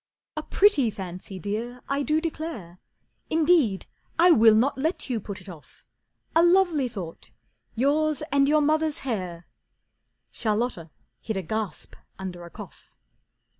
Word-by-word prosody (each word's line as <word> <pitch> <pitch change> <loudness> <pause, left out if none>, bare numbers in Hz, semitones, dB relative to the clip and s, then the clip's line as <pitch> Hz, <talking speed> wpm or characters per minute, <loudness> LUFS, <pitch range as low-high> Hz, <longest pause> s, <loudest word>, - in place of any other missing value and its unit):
"A - - -2
pretty 320 - +3
fancy, 190 -1 -7
Dear, 230 +6 -4
I 280 +1 0
do 305 +2 +1
declare. 310 - -5 0.5
Indeed 310 - +3 0.3
I 350 +2 +6
will 225 -6 +7
not 250 +6 +3
let 295 0 -2
you 235 - 0
put 200 -1 -7
it - - -16
off. 170 -5 -13 0.5
A 330 - +6
lovely 345 -6 +4
thought: 180 -8 -8 0.5
yours 300 +4 +1
and 275 -1 +4
your 305 0 +4
mother's 310 +1 +1
hair!" 180 -8 -4 0.9
Charlotta 215 -6 -1 0.3
hid 220 -3 -3
a 190 - -2
gasp 215 +2 -4 0.2
under 180 -2 -6
a - - -10
cough. - - -13
245 Hz, 135 wpm, -26 LUFS, 195-310 Hz, 0.9 s, will